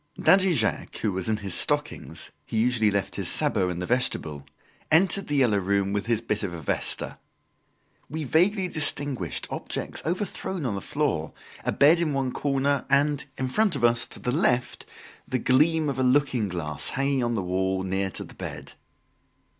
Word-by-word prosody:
Daddy 190 -2 +4
Jacques 110 -5 -1
who 110 - +1
was 95 +2 -2
in 110 - +1
his 100 -4 -1
stockings - - +1
he - - -5
usually 110 -1 +3
left 100 -2 -2
his - - +1
sabots 90 - +2
in 85 - -5
the 90 - -3
vestibule 80 - 0 0.5
entered 190 +4 +3
"The 145 - -1
Yellow 120 -7 +3
Room" 100 +1 0
with 105 +2 -2
his 115 -2 +1
bit 105 -2 -2
of 95 -5 -4
a - - -7
vesta. - - -1 0.9
We 155 +2 -4
vaguely 185 - +2
distinguished 145 - -1
objects - - -5
overthrown 180 -1 -3
on 115 - -1
the 100 - -4
floor, - - -2 0.3
a - - 0
bed 155 +4 +5
in 160 -4 0
one 135 -2 -1
corner, 140 0 0
and, 145 +1 +2
in 130 - -2
front 200 +6 +1
of 130 - -4
us, 120 0 +3
to - - -6
the 125 - -2
left, 125 -3 0 0.4
the 130 - -1
gleam 150 +6 +3
of 135 -2 -2
a - - +2
looking 130 -4 +2
glass 75 -5 -3
hanging 135 -1 0
on 120 0 0
the 100 - -1
wall, 95 +1 -1
near 95 +1 -1
to - - -6
the - - -13
bed. - - -7
125 Hz, 185 wpm, -26 LUFS, 100-145 Hz, 0.9 s, bed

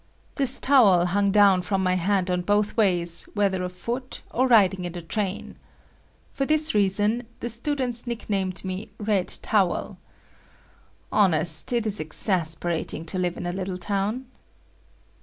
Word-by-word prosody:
This 270 -2 +2
towel 210 -11 +4
hung 200 +3 +1
down 195 -2 +4
from 190 +1 -1
my 185 0 +1
hand 185 +1 0
on 180 0 0
both 205 +3 0
ways 175 -6 +1
whether 195 -3 0
afoot 235 +8 -5
or 255 +2 +1
riding 195 -6 +4
in 175 -1 -5
the 175 - -6
train. 195 +3 -4 0.8
For 275 - -2
this 310 +2 +1
reason, 210 +3 +1
the 240 - -4
students 245 0 -3
nicknamed 195 -6 -3
me 190 +4 -5
Red 205 -4 0 0.2
Towel. 195 -5 0 1.1
Honest, 165 -4 +2
it 235 -2 0
is 210 -2 0
exasperating 165 0 +1
to 185 +3 -4
live 180 -1 -2
in - - -6
a 175 - -2
little 185 0 -4
town. 200 +7 -2
195 Hz, 140 wpm, -24 LUFS, 180-220 Hz, 1.1 s, towel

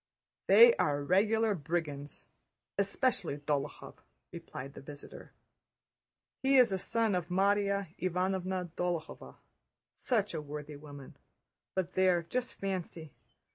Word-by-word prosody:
"They 470 0 +9
are 145 0 +1
regular 215 +6 +3
brigands, 150 -4 -4 0.5
especially 200 - 0
Dólokhov," 145 -1 -3 0.3
replied 135 +2 -8
the - - -10
visitor. 145 +1 -11 1.1
"He 270 0 +4
is 245 -4 +6
a 190 - -1
son 225 +2 0
of 180 -2 -1
Márya 200 -1 +1
Ivánovna 185 0 -1
Dólokhova, 175 -2 -4 0.6
such 210 -6 0
a 160 - -3
worthy 150 0 -7
woman, 145 -2 -11 0.6
but 185 -1 -1
there, 185 -2 +3
just 245 +9 -3
fancy! 175 -6 -5
180 Hz, 110 wpm, -32 LUFS, 150-200 Hz, 1.1 s, They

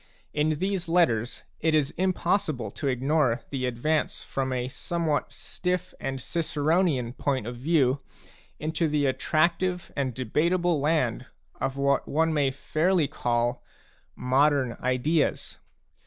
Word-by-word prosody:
In 150 +1 +1
these 190 -1 -2
letters, 125 -10 +2 0.2
it 160 0 +2
is 145 -3 +2
impossible 175 - 0
to 145 - -4
ignore 135 -1 +1
the 130 -2 -1
advance 150 +6 -1
from 135 -1 -2
a 125 -1 -1
somewhat 155 +2 -2
stiff 180 -1 -3
and 135 0 -3
Ciceronian 155 -4 0
point 135 -4 -1
of 120 +1 -5
view 140 -1 +2 0.6
into 160 +2 0
the 150 -1 +1
attractive 170 +6 +1
and 130 -4 -1
debatable 165 +7 +1
land 140 -5 0 0.3
of 135 0 -2
what 140 0 +1
one 160 +2 +1
may 145 -3 +2
fairly 155 +5 +1
call 120 -4 -1 0.5
modern 130 -1 +2
ideas. 130 +5 0
145 Hz, 125 wpm, -27 LUFS, 130-165 Hz, 0.6 s, letters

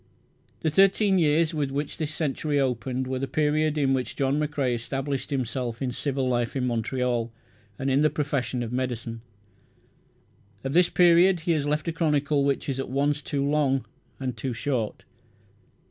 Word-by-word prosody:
The 160 - +1
thirteen 195 +2 +4
years 160 +1 +3
with 145 -3 -1
which 145 +2 -3
this 155 -2 -2
century 150 -1 -1
opened 130 0 -1
were 130 0 -3
the 135 - -2
period 155 +1 +1
in 135 -2 +2
which 130 -1 -2
John 140 +1 +1
McCrae 145 -4 0
established 135 +3 -3
himself 125 -3 -2
in 130 -2 -2
civil 135 +1 -1
life 120 0 0
in 130 -2 0
Montreal 120 0 -1 0.5
and 135 - -3
in 135 +2 +3
the 155 - +4
profession 130 -5 -1
of 120 +1 -5
medicine. 120 -2 -3 1.4
Of 135 0 -3
this 175 +1 +5
period 175 0 +5
he 170 +1 0
has 150 -3 +1
left 150 +2 -1
a - - +1
chronicle 150 -3 +1
which 140 +2 0
is 135 -2 -2
at 135 - -3
once 145 +3 0
too 140 -1 -2
long 140 -3 +1 0.3
and 130 -3 -3
too 125 +3 -3
short. 120 -3 -2
140 Hz, 170 wpm, -26 LUFS, 125-150 Hz, 1.4 s, this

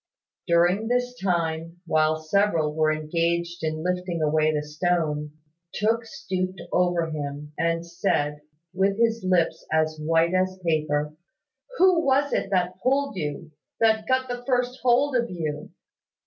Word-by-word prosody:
During 175 +5 +3
this 245 +1 0
time, 170 -2 -1
while 155 -1 +2
several 160 -2 +1
were 155 0 +2
engaged 170 +2 -1
in 155 0 -2
lifting 180 -1 -2
away 155 0 +2
the 150 -1 -1
stone, 150 -1 -1 0.4
Tooke 225 +2 +1
stooped 185 -2 -4
over 175 -2 +1
him, 150 0 -5
and 165 +1 0
said, 150 -4 -1 0.3
with 195 +2 +1
his 230 -1 +1
lips 175 -3 +1
as 155 0 +1
white 165 +2 +2
as 185 0 +1
paper, 150 -2 0 0.6
"Who 365 -3 +5
was 280 +1 +2
it - - 0
that 180 -1 0
pulled 275 -1 +1
you, 150 -1 -4 0.3
that 220 -1 +3
got 260 0 +1
the 245 0 -5
first 250 0 0
hold 260 +3 +3
of 240 -1 +1
you? 155 -4 -4
175 Hz, 140 wpm, -25 LUFS, 155-215 Hz, 0.6 s, Who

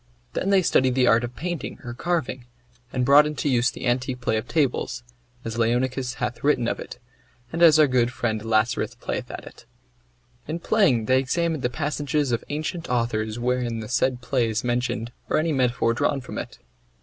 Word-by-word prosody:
Then 195 - -1
they 195 -2 +4
studied 130 -5 +3
the 130 -1 +4
art 115 0 +4
of 120 0 -5
painting 175 -2 -4
or 120 - -6
carving; 135 -4 -2 0.5
or 130 - -4
brought 140 +4 +6
into 150 0 -3
use 125 -2 +3
the 135 - -7
antique 125 +1 0
play 120 -2 0
of 110 +2 -2
tables, 140 -5 0 0.4
as 115 +1 -4
Leonicus 125 +2 0
hath 125 - -4
written 130 -5 +2
of - - -2
it, - - -8 0.6
and 165 - -2
as 160 -3 +8
our 155 - +7
good 125 -3 +2
friend 110 -3 -2
Lascaris 110 +2 +1
playeth - - -4
at - - -7
it. - - -14 0.8
In 155 +3 -2
playing 170 - +2
they 130 +3 +4
examined 160 +3 -1
the 125 - 0
passages 145 0 -1
of 115 - -1
ancient 155 +3 -4
authors 115 -3 -1
wherein 120 -1 -1
the 110 - -6
said 125 +1 0
play 125 -2 0
is 110 +1 -1
mentioned 120 -1 -1 0.2
or - - +2
any 160 +1 +1
metaphor 125 -4 +1
drawn 140 +4 0
from 125 - -6
it. - - -7
125 Hz, 190 wpm, -24 LUFS, 120-145 Hz, 0.8 s, as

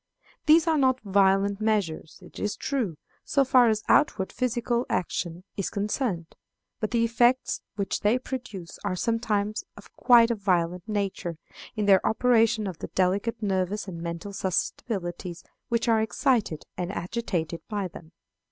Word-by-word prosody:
These 315 +2 +6
are 320 -2 +2
not 260 -1 +3
violent 195 0 +2
measures, 200 -8 -1
it - - -12
is 210 - -1
true, 230 - -2 0.3
so 275 -1 +2
far 250 -2 +5
as 215 0 0
outward 195 -10 +3
physical 240 -1 0
action 175 -1 -2
is 195 - -1
concerned; 200 - -2 0.5
but 215 - -1
the 235 -1 +1
effects 240 +3 +2
which 200 -2 -2
they 210 +4 +3
produce 235 -9 -7
are 200 -3 -1
sometimes 215 0 -1
of - - -14
quite 240 -2 +6
a - - +1
violent 180 -1 0
nature, 195 -5 -2 0.4
in 210 -2 -1
their 195 -2 +5
operation 225 -2 +3
on 190 - -3
the - - -5
delicate 200 +5 0
nervous 195 +1 -1
and 170 -3 -6
mental 170 +4 -5
susceptibilities 180 -2 -3 0.3
which 235 0 0
are 225 -1 +4
excited 220 - 0
and 180 0 -3
agitated 175 -5 -3
by 205 -3 -2
them. 165 -2 -13
205 Hz, 150 wpm, -26 LUFS, 185-235 Hz, 0.5 s, These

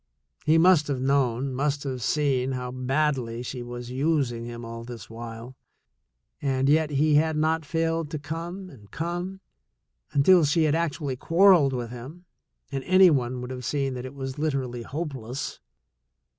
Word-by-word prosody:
He 155 +1 +5
must 170 -2 +5
have 140 -3 -1
known, 130 -1 +1
must 140 +2 -1
have 130 -3 -4
seen 135 -1 +1
how 125 -1 -4
badly 130 -2 -1
she 125 0 -5
was 120 0 -7
using 130 -4 0
him 120 0 -7
all 115 0 -7
this 120 -1 -9
while, 115 +2 -8 0.9
and 135 -1 +1
yet 155 +1 +3
he 150 +1 +2
had 155 +1 +3
not 160 +1 +1
failed 165 0 0
to 155 - -3
come 165 +6 -6
and 105 -7 -16
come, 175 +3 -4 0.7
until 165 +5 +5
she 150 +3 +3
had 150 -2 +2
actually 150 -5 -1
quarreled 170 -3 +5
with 120 -2 -4
him, 135 +9 -10 0.5
and 135 -1 -3
any 185 -1 +7
one 125 -3 0
would 125 +1 -6
have 125 -1 -6
seen 135 +1 -1
that 125 0 -5
it 130 +2 -8
was 135 0 -5
literally 135 -6 -2
hopeless. 135 -3 -5
140 Hz, 160 wpm, -26 LUFS, 125-155 Hz, 0.9 s, any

